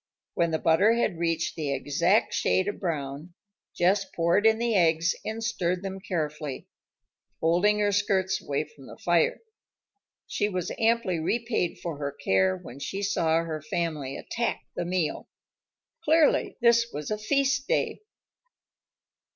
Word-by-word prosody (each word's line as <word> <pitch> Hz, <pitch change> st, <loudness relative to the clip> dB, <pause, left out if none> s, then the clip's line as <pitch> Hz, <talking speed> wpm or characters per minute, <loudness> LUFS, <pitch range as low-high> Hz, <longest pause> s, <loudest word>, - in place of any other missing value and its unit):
When 170 Hz, -1 st, +1 dB
the 160 Hz, -, 0 dB
butter 165 Hz, +8 st, +4 dB
had 215 Hz, -7 st, 0 dB
reached 165 Hz, -1 st, -1 dB
the 150 Hz, -4 st, -2 dB
exact 150 Hz, +9 st, +1 dB
shade 185 Hz, +1 st, +1 dB
of 205 Hz, -, -3 dB
brown, 155 Hz, -1 st, -4 dB, 0.4 s
Jess 195 Hz, +3 st, +3 dB
poured 190 Hz, +2 st, +2 dB
in 220 Hz, 0 st, +4 dB
the 235 Hz, 0 st, 0 dB
eggs 170 Hz, -2 st, +3 dB
and 225 Hz, +1 st, -4 dB
stirred 185 Hz, -4 st, -1 dB
them 195 Hz, 0 st, -5 dB
carefully, 150 Hz, -6 st, -4 dB, 0.7 s
holding 180 Hz, +6 st, +3 dB
her 205 Hz, -1 st, +2 dB
skirts 190 Hz, -1 st, +1 dB
away 145 Hz, +1 st, -1 dB
from 145 Hz, -3 st, -16 dB
the -, -, -11 dB
fire. 175 Hz, -1 st, +1 dB, 0.8 s
She 205 Hz, -, -1 dB
was 185 Hz, -3 st, -3 dB
amply 225 Hz, -6 st, +2 dB
repaid 225 Hz, +1 st, -1 dB
for 165 Hz, -4 st, -4 dB
her 140 Hz, -1 st, -2 dB
care 95 Hz, -9 st, +1 dB
when 125 Hz, +8 st, -11 dB
she 195 Hz, +8 st, -4 dB
saw 165 Hz, -5 st, +1 dB
her 155 Hz, -2 st, -4 dB
family 155 Hz, -3 st, -3 dB
attack 235 Hz, 0 st, -2 dB
the 175 Hz, -, -2 dB
meal. 175 Hz, -3 st, -2 dB, 0.7 s
Clearly 315 Hz, -1 st, +3 dB
this 235 Hz, 0 st, +5 dB
was 150 Hz, +4 st, -5 dB
a 210 Hz, -, -1 dB
feast 275 Hz, +4 st, +1 dB
day. -, -, 0 dB
175 Hz, 145 wpm, -27 LUFS, 155-210 Hz, 0.8 s, this